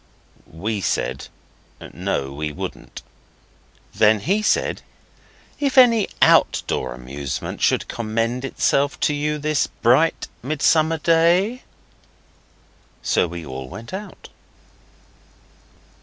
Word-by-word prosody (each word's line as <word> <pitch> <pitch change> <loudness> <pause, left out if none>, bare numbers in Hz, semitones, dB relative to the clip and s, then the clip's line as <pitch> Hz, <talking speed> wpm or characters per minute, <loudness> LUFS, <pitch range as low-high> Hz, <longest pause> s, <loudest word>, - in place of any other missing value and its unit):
We 100 +6 -3
said, - - -2 0.7
'No, 70 0 -3
we 75 +1 -4
wouldn't.' 75 - -8 0.9
Then 105 -1 +4
he 200 - +1
said, 215 - 0 0.8
'If 280 -2 -1
any 230 -5 +6 0.2
outdoor - - +2
amusement 65 +2 -6
should - - +2
commend 115 +2 -2
itself 140 +1 0
to 150 - +2
you 150 +1 -1
this 150 -1 0
bright 130 +8 +2
mid 145 +3 -4
summer 160 0 +3
day.' 170 +9 +2 1.4
So - - +2
we 85 -1 -7
all 65 -1 -7
went 115 - -10
out. 205 +2 -8
135 Hz, 100 wpm, -21 LUFS, -, 1.4 s, any